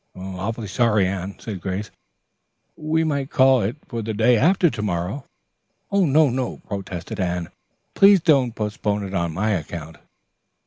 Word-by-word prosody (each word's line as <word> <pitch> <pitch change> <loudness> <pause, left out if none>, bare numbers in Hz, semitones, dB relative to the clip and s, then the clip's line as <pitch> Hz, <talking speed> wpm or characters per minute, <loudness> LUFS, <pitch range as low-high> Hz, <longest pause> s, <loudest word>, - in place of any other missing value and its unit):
"Awfully 95 +5 -5
sorry, 105 -1 +2
Anne," 95 +1 -4
said 100 -5 -6
Grace. 95 +2 -4 0.8
"We 160 +1 0
might 140 -3 -1
call 130 -3 +4
it 105 +6 -2
for 115 -3 -4
the 110 0 -4
day 115 +3 +4
after 170 - +3
to 115 - -5
morrow." 100 +6 -3 0.7
"No, 160 -6 +4
no," 130 0 -2
protested 95 -4 -6
Anne. 90 -2 -2 0.4
"Please 195 0 +6
don't 140 -8 +2
postpone 105 -1 -2
it 95 0 -6
on 85 -3 -1
my 105 +7 -1
account." 80 -3 -4
105 Hz, 145 wpm, -22 LUFS, 95-135 Hz, 0.8 s, Please